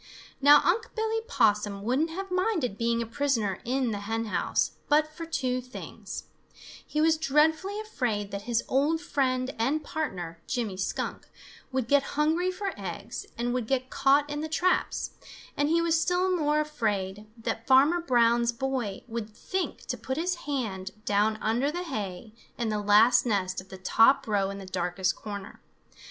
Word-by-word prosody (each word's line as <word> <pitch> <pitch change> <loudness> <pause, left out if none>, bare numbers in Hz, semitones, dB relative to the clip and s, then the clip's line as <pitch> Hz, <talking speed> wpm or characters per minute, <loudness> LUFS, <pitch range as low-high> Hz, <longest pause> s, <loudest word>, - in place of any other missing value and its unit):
Now 290 +1 +8
Unc' 450 +7 +1
Billy 445 0 0
Possum 205 - +1
wouldn't 265 +9 +1
have 385 +3 -6
minded 365 - 0
being 235 +1 0
a - - -6
prisoner 230 -5 0
in 255 0 0
the 205 - -3
hen 225 +3 -2
house 215 - 0 0.2
but 305 +1 +3
for 330 +1 -7
two 255 -5 -1
things; 250 +1 -8 0.6
he 300 - -3
was 320 +1 +4
dreadfully 320 +7 +2
afraid 240 - -2
that 200 0 -4
his 235 -1 +2
old 290 +5 +2
friend 260 -6 0
and 280 +7 +1
partner, 180 - -4
Jimmy 230 -7 -2
Skunk, 185 - -3 0.4
would 260 -3 -1
get 285 +2 +5 0.2
hungry 320 +4 +2
for 380 +1 -3
eggs 195 +3 -6
and 240 +1 -1
would 250 -3 -2
get 260 0 -1
caught 280 +2 +3
in 295 0 -3
the 315 - -4
traps, 360 +3 +1 0.4
and 290 +1 +1
he 335 +1 +3
was 330 -1 +2
still 365 +1 +2
more 300 -2 +2
afraid 215 -9 -2
that 225 0 -4
Farmer 285 +7 +5
Brown's 235 -4 +3
boy 240 -5 -3
would 225 -2 -4
think 365 - -4
to - - -3
put 260 +1 -3
his 355 +3 0 0.2
hand 210 -9 -2 0.2
down 210 +1 +2
under 240 +6 +1
the 350 +3 -3
hay 215 - -5 0.2
in 235 -2 -1
the 210 -1 -1
last 215 +4 +6
nest 190 -5 -1
of 190 - -18
the 190 - -8
top 225 +8 +4
row 200 -3 +1
in 200 - -5
the 195 - -8
darkest 185 0 -1
corner. 200 -2 -8
255 Hz, 170 wpm, -28 LUFS, 210-310 Hz, 0.6 s, Now